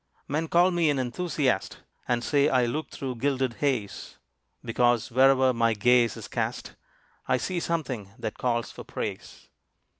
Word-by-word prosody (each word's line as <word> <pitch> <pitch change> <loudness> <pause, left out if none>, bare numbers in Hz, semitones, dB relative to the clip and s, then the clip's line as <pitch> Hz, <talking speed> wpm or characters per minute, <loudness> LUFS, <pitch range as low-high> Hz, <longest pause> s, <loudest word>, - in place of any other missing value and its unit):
Men 155 +3 -1
call 175 +3 +4
me 170 -3 +2
an 145 - +1
enthusiast, 135 +1 -1 0.3
And 120 -1 0
say 145 +2 +2
I 125 -2 +3
look 145 +6 -3
through 130 -3 -5
gilded 130 -2 -1
haze: 125 -9 -2 0.5
Because 120 0 +1
where'er 130 +1 +4
my 115 -1 +2
gaze 120 +1 +3
is - - -8
cast, - - -3 0.5
I - - +3
see 180 +8 -2
some 170 -1 -1
thing 115 -7 -6
that - - -5
calls 120 -2 -1
for - - -10
praise. - - -6
130 Hz, 155 wpm, -27 LUFS, 120-145 Hz, 0.5 s, call